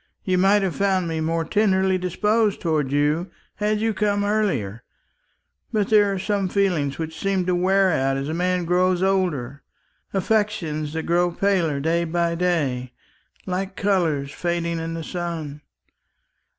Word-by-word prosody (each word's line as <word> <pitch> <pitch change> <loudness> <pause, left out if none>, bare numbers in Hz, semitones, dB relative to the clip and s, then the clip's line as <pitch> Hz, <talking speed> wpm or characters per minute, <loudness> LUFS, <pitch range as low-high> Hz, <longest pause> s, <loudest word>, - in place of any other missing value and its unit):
You 185 -1 +1
might 195 +2 +4
have 185 -3 -1
found 190 -3 +1
me 160 -1 -2
more 165 +1 -1
tenderly 190 -1 +2
disposed 210 +4 +1
towards 155 -5 0
you, 150 +5 +1 0.3
had 210 0 0
you 225 0 0
come 205 0 0
earlier; 190 - -1 0.9
but 210 -3 0
there 205 -2 +4
are 195 - -2
some 195 0 -1
feelings 180 -8 0
which 160 0 -5
seem 195 -2 0
to 180 - +1
wear 190 +2 +3
out 135 -3 +1
as 135 +1 -3
a 155 - -3
man 180 +1 0
grows 180 +1 +2
older, 155 -9 0 0.5
affections 185 -7 -1
that 160 0 -3
grow 175 +1 +2
paler 175 -5 0
day 165 +4 +1
by 170 0 0
day, 145 -8 -1 0.5
like 190 +1 -3
colours 165 -9 0
fading 170 0 -2
in 165 0 -4
the 165 - -5
sun. 160 -4 -5
180 Hz, 150 wpm, -23 LUFS, 160-195 Hz, 0.9 s, might